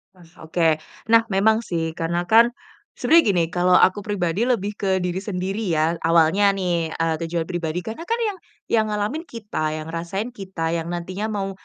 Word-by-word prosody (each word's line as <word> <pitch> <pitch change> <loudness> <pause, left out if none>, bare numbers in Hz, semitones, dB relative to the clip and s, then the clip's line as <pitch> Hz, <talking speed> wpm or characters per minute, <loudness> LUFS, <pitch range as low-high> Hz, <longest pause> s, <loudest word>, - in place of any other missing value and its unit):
Mas 175 -2 -18
oke, 160 -1 +1 0.3
nah 230 0 +5
memang 220 +2 +3
sih, 165 -7 -3
karena 170 +1 -2
kan 225 +6 +6 0.5
sebenernya 330 +1 +5
gini, 170 - +3
kalau 180 0 +3
aku 190 +2 +5
pribadi 205 +1 -1
lebih 210 -5 0
ke 190 -2 0
diri 180 +1 -2
sendiri 195 +2 -3
ya. 160 +2 +1
Awalnya 170 +5 +3
nih, 175 -4 0
eee, 165 0 0
tujuan 165 0 -1
pribadi. 175 0 -3
Karena 230 +10 -7
kan 465 +1 0
yang, 415 -3 -2 0.3
yang 220 -1 +3
ngalamin 215 +11 -2
kita, 205 - -3
yang 155 +1 -6
ngerasain 190 +8 -4
kita, 185 -7 -4
yang 165 0 -2
nantinya 180 +4 -4
mau 200 -3 -3
185 Hz, 175 wpm, -22 LUFS, 165-210 Hz, 0.5 s, kan